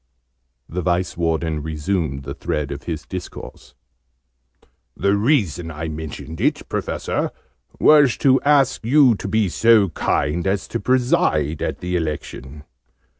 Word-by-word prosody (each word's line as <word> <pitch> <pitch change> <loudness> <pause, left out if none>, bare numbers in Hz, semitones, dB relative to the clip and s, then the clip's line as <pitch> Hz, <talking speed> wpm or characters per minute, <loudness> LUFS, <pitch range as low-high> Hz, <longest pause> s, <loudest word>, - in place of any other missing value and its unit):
The 90 +2 -4
Vice 90 +1 0
Warden 80 -2 -1
resumed 75 -2 -2
the 70 +1 -6
thread 75 0 -3
of 70 0 -7
his 80 -2 -4
discourse. 90 -2 -9 1.2
"The 100 +2 +2
reason 100 - +1
I 80 0 -5
mentioned 80 +1 -7
it, - - 0
Professor, - - -2 0.5
was 145 -5 +5
to 130 -2 +3
ask 140 -4 +3
you 130 +1 +5
to 100 - -5
be 110 0 +1
so 110 +1 +4
kind 80 +2 -1
as 95 -1 -1
to - - -2
preside 95 - +1
at - - -3
the 90 0 -2
Election. 75 -3 -5
85 Hz, 130 wpm, -21 LUFS, 75-110 Hz, 1.2 s, was